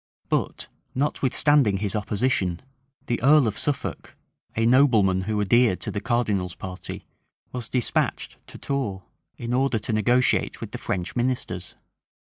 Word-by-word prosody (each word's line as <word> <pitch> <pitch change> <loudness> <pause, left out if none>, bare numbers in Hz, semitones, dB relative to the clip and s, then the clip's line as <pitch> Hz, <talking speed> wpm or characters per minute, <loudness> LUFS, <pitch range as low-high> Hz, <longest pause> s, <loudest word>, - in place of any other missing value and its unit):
But, - - -1 0.3
notwithstanding 140 -4 +2
his 100 0 -2
opposition, 100 -4 0 0.4
the 120 - -1
earl 145 +2 +6
of 105 -3 -1
Suffolk, 140 -3 -3 0.4
a 115 - +1
nobleman 115 -7 +4
who 105 0 -1
adhered 110 0 +3
to - - -3
the 105 - -3
cardinal's 105 -7 0
party, 90 0 -7 0.5
was 125 -3 -5
despatched 125 -2 -1
to - - -11
Tours, 110 -9 -3 0.3
in 120 +1 -4
order 130 -1 +2
to 110 +2 -3
negotiate 125 +4 +2
with - - -7
the - - -6
French 90 0 -3
ministers. 120 -8 -2
115 Hz, 135 wpm, -25 LUFS, 100-130 Hz, 0.5 s, earl